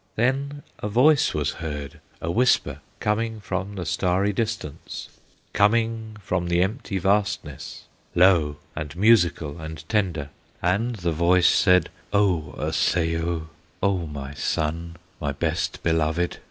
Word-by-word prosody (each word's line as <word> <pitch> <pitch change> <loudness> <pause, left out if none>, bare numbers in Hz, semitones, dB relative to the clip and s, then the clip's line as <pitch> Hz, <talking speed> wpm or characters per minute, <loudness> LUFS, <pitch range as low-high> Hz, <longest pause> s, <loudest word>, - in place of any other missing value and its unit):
"Then 140 +4 0 0.2
a 105 - -3
voice 145 +7 +4
was 75 -2 0
heard, 75 -3 -6 0.2
a 85 - -2
whisper, 85 - +2 0.2
Coming 110 +1 -1
from 100 0 -4
the 90 -3 -4
starry 95 +5 +1
distance, 110 -9 -4 0.4
Coming 110 +1 +1
from 90 -1 -1
the 85 +1 +3
empty 105 0 -3
vastness, 100 +2 -1 0.3
Low, 85 -5 +4 0.2
and 75 -1 -5
musical, 90 -7 +3
and 80 -1 -8
tender; 90 -10 0 0.3
And 105 +7 0
the 85 -4 -1
voice 85 +2 +3
said: 90 -2 +4 0.2
'O 90 -8 +2
Osseo! 80 -1 0 0.3
O 95 -4 +1
my 70 -1 -6
son, 85 +3 -2 0.2
my 70 -3 -2
best 80 +3 -2
beloved! 80 +1 +1
90 Hz, 125 wpm, -24 LUFS, 80-105 Hz, 0.4 s, voice